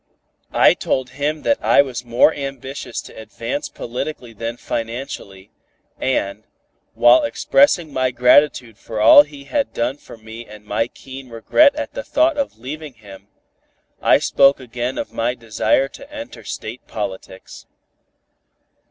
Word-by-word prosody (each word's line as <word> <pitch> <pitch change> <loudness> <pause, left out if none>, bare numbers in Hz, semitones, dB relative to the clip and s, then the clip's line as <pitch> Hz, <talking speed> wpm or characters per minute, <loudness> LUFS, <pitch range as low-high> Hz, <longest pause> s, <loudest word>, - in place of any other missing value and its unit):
I - - +6
told 130 -1 -2
him 150 +2 -3
that 285 - +1
I 140 - +5
was 125 -3 -6
more 120 +6 +3
ambitious 135 -2 -6
to - - -13
advance 285 - -5
politically 125 - -6
than 115 +2 -5
financially, 115 -6 -6 0.5
and, 105 -5 -1 0.5
while 320 - +6
expressing 275 - +2
my 130 0 +1
gratitude 125 -2 +3
for 110 -2 -6
all 110 +6 +9
he 145 -1 -9
had 280 - -2
done 125 +4 -1
for 120 - -14
me 110 +1 -10
and 105 0 -13
my 105 +2 -1
keen 135 +1 -11
regret 280 - +3
at 300 - -5
the - - -4
thought 320 -5 +2
of 280 - -3
leaving 145 +3 -8
him, 100 -3 -14 0.7
I - - +5
spoke 140 0 +3
again 125 0 -4
of - - -5
my 120 +2 -1
desire 115 +3 0
to 275 - -14
enter 285 - -9
State 110 +4 -7
politics. 95 -3 -7
125 Hz, 145 wpm, -20 LUFS, 115-150 Hz, 0.7 s, all